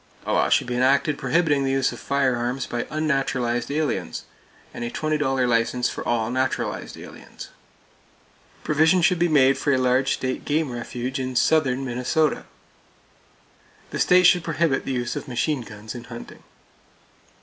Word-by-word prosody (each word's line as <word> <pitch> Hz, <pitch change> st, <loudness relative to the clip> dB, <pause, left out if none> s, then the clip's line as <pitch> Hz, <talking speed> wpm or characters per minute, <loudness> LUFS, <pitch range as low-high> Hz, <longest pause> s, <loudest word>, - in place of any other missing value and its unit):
A -, -, -1 dB
law -, -, +2 dB
should -, -, +3 dB
be 125 Hz, -, -4 dB
enacted 135 Hz, +4 st, +2 dB
prohibiting 145 Hz, 0 st, +1 dB
the 135 Hz, -, 0 dB
use 135 Hz, -1 st, +1 dB
of -, -, -9 dB
firearms 130 Hz, -2 st, 0 dB
by 120 Hz, 0 st, -3 dB
unnaturalized 135 Hz, -6 st, -1 dB
aliens, 145 Hz, -, -2 dB, 0.5 s
and 120 Hz, -, -6 dB
a 120 Hz, -, -3 dB
$20 140 Hz, -3 st, 0 dB
license 120 Hz, +1 st, +1 dB
for -, -, -6 dB
all 115 Hz, -1 st, 0 dB
naturalized 130 Hz, +1 st, -2 dB
aliens. -, -, -11 dB, 1.1 s
Provision 160 Hz, +4 st, +3 dB
should 180 Hz, 0 st, +3 dB
be 175 Hz, -, +3 dB
made 135 Hz, -4 st, +4 dB
for 145 Hz, -, +1 dB
a 130 Hz, -, +3 dB
large 130 Hz, +1 st, +2 dB
state 130 Hz, 0 st, -3 dB
game 150 Hz, -2 st, 0 dB
refuge 125 Hz, +2 st, -4 dB
in 130 Hz, -1 st, -4 dB
southern 135 Hz, 0 st, +2 dB
Minnesota. 130 Hz, +5 st, 0 dB, 1.5 s
The -, -, -4 dB
state 180 Hz, 0 st, +5 dB
should 175 Hz, -1 st, +5 dB
prohibit 165 Hz, -4 st, 0 dB
the -, -, -3 dB
use 120 Hz, -2 st, -2 dB
of -, -, -6 dB
machine 130 Hz, +3 st, -1 dB
guns 110 Hz, -1 st, -9 dB
in 120 Hz, -1 st, -9 dB
hunting. 120 Hz, -1 st, -10 dB
130 Hz, 155 wpm, -23 LUFS, 125-150 Hz, 1.5 s, state